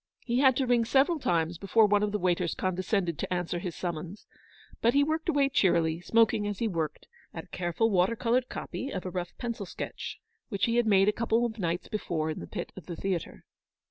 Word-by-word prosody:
He 240 0 +1
had 265 -2 +5
to 270 - +1
ring 240 -2 +3
several 275 +7 +3
times 170 - 0
before 215 +3 +4
one 205 0 +3
of 210 -1 0
the 210 - 0
waiters 175 -2 0
con 185 0 -1
descended 180 -2 -1
to - - -4
answer 175 -1 -1
his 175 -2 -5
summons, 175 +3 -5 0.6
but 235 +3 +3
he 285 - +5
worked 315 +3 -1
away 285 -3 +3
cheerily, 170 - +2
smoking 220 +1 +3
as 205 -1 -3
he 230 - 0
worked, 165 -6 -3 0.3
at - - -5
a - - -20
careful 180 +6 0
water 190 +4 +3
coloured 245 +2 +1
copy 270 - -5
of 185 -8 -5
a 185 - -3
rough 175 -1 -5
pencil 230 -5 -4
sketch - - -6 0.3
which 200 -5 0
he 235 0 +1
had 240 -2 +3
made 195 -2 +5
a - - +6
couple 230 +1 +1
of 225 -1 -4
nights 175 -1 -2
before 165 -7 -2
in - - -5
the - - -7
pit - - -5
of 190 - -11
the 175 - -5
theatre. 185 -2 -3
200 Hz, 225 wpm, -29 LUFS, 175-235 Hz, 0.6 s, a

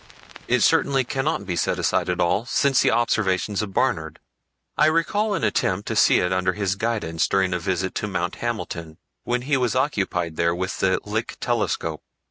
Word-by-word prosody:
It - - +2
certainly 135 -1 +3
cannot 135 -2 -2
be 90 -2 -3
set - - 0
aside - - 0
at 90 0 -1
all 90 +5 +2
since 135 0 +3
the - - +3
observations 105 -4 +1
of 105 -2 -4
Barnard. 85 -10 -1 0.6
I 150 - +4
recall 200 +6 +1
an - - -3
attempt 95 +2 0
to - - -2
see - - +5
it 90 +1 0
under 95 0 +1
his 100 -1 -1
guidance 100 -7 -1
during 95 -2 +1
a 90 - -1
visit 95 +1 -2
to 105 - -2
Mount 90 -3 -3
Hamilton, 85 -9 -4 0.3
when 125 0 -1
he 140 +1 +1
was 125 -2 0
occupied 95 - -1
there 85 0 +2
with 95 +2 -3
the 95 -1 +2
Lick 110 +3 -3
telescope. 120 -1 -1
100 Hz, 185 wpm, -23 LUFS, 90-125 Hz, 0.6 s, see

